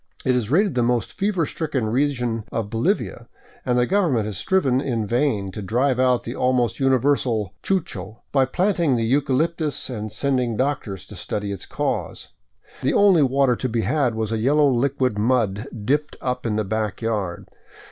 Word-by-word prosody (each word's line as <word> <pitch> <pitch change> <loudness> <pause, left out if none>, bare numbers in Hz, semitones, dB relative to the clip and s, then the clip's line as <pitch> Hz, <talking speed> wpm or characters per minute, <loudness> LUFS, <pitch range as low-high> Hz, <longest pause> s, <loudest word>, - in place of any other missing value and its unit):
It 130 - +3
is 115 -4 -1
rated 190 +5 +3
the 125 - +1
most 120 -2 0
fever 195 -4 0
stricken 145 -6 -2
region 120 -2 0
of 110 -3 -3
Bolivia, 120 - -1 0.4
and 125 -1 +1
the 125 - +3
government 160 - +1
has 105 -2 -4
striven 135 - +1
in 115 -6 -1
vain 115 -4 0
to 105 - -6
drive 125 +6 +1
out 125 -1 +3
the 120 - -5
almost 125 -1 +1
universal 130 -6 +1
chucho 110 - -3
by 135 -2 +3
planting 170 -1 +1
the 115 -1 0
eucalyp 140 +6 +1
tus 150 -4 -2
and 110 -3 -5
sending 125 -1 0
doctors 130 -8 -2
to - - -12
study 105 -1 -4
its 100 - -6
cause. - - -3 0.5
The - - +1
only 195 -5 +5
water 135 -2 +3
to 130 - -2
be 115 0 0
had 130 -3 +1
was 110 -1 -2
a 115 - 0
yellow 145 +4 +3
liquid 130 -3 0
mud 110 -1 +1 0.2
dipped 145 +4 0
up 125 -2 -2
in 105 - 0
the 110 -1 0
back 110 +2 -2
yard. 105 -6 -2
125 Hz, 175 wpm, -22 LUFS, 110-140 Hz, 0.5 s, only